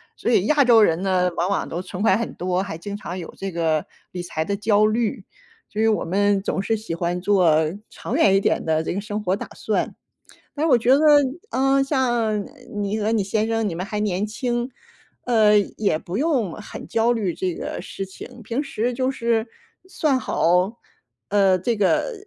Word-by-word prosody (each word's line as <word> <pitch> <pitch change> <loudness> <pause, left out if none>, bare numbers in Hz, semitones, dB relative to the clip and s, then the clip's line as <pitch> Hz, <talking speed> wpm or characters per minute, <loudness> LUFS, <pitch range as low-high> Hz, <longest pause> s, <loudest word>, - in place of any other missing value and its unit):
所 240 - -1
以 200 -3 +3
亚 295 -2 +4
洲 235 -3 +6
人 165 -3 +3
呢， 185 -2 +2
往 175 +3 0
往 200 - -1
都 175 +2 -4
存 185 +1 -7
款 195 -2 +4
很 230 - -4
多， 180 +1 -1
还 195 -5 -6
经 200 +4 -6
常 185 -3 -6
有 170 - -8
这 195 0 -4
个 160 -2 0 0.3
理 180 - -5
财 160 -2 -3
的 200 - -1
焦 210 0 +3
虑。 215 -2 -1 0.5
所 215 - -2
以 225 - +4
我 220 - +1
们 200 +3 +1
总 190 - -2
是 225 +3 0
喜 210 -6 -5
欢 175 +1 -2
做 165 -6 +3 0.2
长 245 - -5
远 200 -12 +4
一 - - +5
点 195 - 0
的 160 0 +1
这 - - -2
个 195 - -3
生 210 0 -4
活 185 -1 +1
打 - - -7
算。 - - -2 0.6
但 300 - -1
是 - - +2
我 250 - +7
觉 240 +2 +1
得， - - +4 0.5
嗯， 270 +1 +2
像 240 -7 0 0.3
你 205 +1 -2
和 215 +1 0
你 220 -3 +2
先 215 +3 0
生 225 -1 0
你 170 - -4
们 180 +3 -4
还 210 0 -3
年 205 -1 0
轻， 240 +3 -2 0.5
呃， 215 -3 +5
也 200 -5 -1
不 175 +3 -6
用 265 - +1
很 210 - -9
焦 230 +1 +2
虑 200 -7 -1
这 185 -2 -2
个 - - -5
事 195 - -6
情， 235 +6 -11
平 230 +6 -2
时 245 -3 -2
就 255 +2 0
是 235 -3 0 0.4
算 300 -7 +1
好， 180 0 +1 0.5
呃， 195 -2 +3
这 225 +6 -1
个 205 - +1
205 Hz, 220 characters per minute, -22 LUFS, 185-230 Hz, 0.6 s, 我